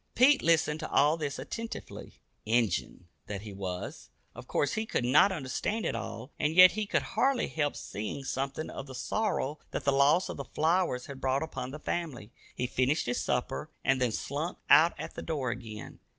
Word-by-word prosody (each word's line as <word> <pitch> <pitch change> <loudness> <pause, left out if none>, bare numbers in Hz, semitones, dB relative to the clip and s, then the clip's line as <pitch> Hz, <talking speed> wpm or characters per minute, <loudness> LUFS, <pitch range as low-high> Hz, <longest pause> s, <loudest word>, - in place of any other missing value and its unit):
Pete 275 +3 +6
listened 160 -2 +2
to 155 - -5
all 150 +2 +4
this 150 -3 -3
attentively. 230 0 -7 0.2
"Injun" 110 -5 0 0.2
that 100 -1 -4
he 105 -2 -8
was, 95 -2 -6 0.2
of - - -11
course 145 - 0
he 220 0 -2
could 120 - -1
not 150 +10 +6
understand 190 - -2
it - - 0
all, 115 +5 -6
and 150 +2 +1
yet 185 0 +10
he 215 -1 -3
could - - +1
hardly 265 -1 +2
help 145 -2 -1
seeing 110 +7 -5
something 135 +3 -3
of 135 - -7
the 130 - -9
sorrow 155 - -1
that - - -4
the 140 - +3
loss 145 +6 +4
of - - -6
the 140 - -4
flowers 160 -4 +1
had 135 -1 -9
brought 135 +2 +1
upon 145 -5 -5
the 145 - -6
family. 150 -8 -4 0.2
He 125 - -1
finished 130 +4 +1
his 125 0 -1
supper, 125 +5 -2 0.2
and 130 0 +3
then 125 -2 +2
slunk 150 +9 -3
out 165 +2 +6
at - - -6
the - - -6
door 140 -7 -2
again. 110 -3 -8
140 Hz, 195 wpm, -30 LUFS, 125-165 Hz, 0.2 s, yet